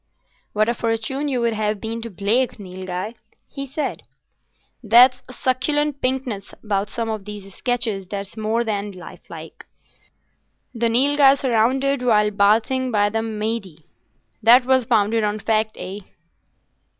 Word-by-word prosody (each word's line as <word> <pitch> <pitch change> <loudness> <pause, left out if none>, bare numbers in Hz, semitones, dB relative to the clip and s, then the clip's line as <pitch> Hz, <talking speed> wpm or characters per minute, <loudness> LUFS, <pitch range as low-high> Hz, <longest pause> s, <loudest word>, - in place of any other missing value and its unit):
"What 215 +1 +2
a 235 - +2
fortune 230 +5 -2
you 255 -4 -1
would 235 -1 +1
have 210 -1 -1
been 225 +1 -4
to 230 - -6
Blake, 220 +6 0
Nilghai!" 185 +1 -6 0.3
he 275 -1 -7
said. 290 +3 -3 0.8
"There's 250 +3 +6
a - - -9
succulent 280 +3 0
pinkness 255 -6 -2
about 205 -1 -1
some 230 +1 -3
of 215 -3 -4
these 205 -2 -9
sketches 230 -6 -2
that's 200 +1 -6
more 220 +2 0
than 205 -2 -3
life 180 -2 -12
like. - - -11 1.1
"The 235 -1 0
Nilghai 275 +3 +5
surrounded 265 +2 +1
while 210 -4 +3
bathing 220 +6 +2
by 205 -3 +2
the 225 +1 0
Mahdieh"—that 220 - 0
was 260 -1 +3
founded 220 +1 +2
on 210 0 0
fact, 215 0 0
eh?" 195 +2 -6
225 Hz, 140 wpm, -21 LUFS, 210-255 Hz, 1.1 s, There's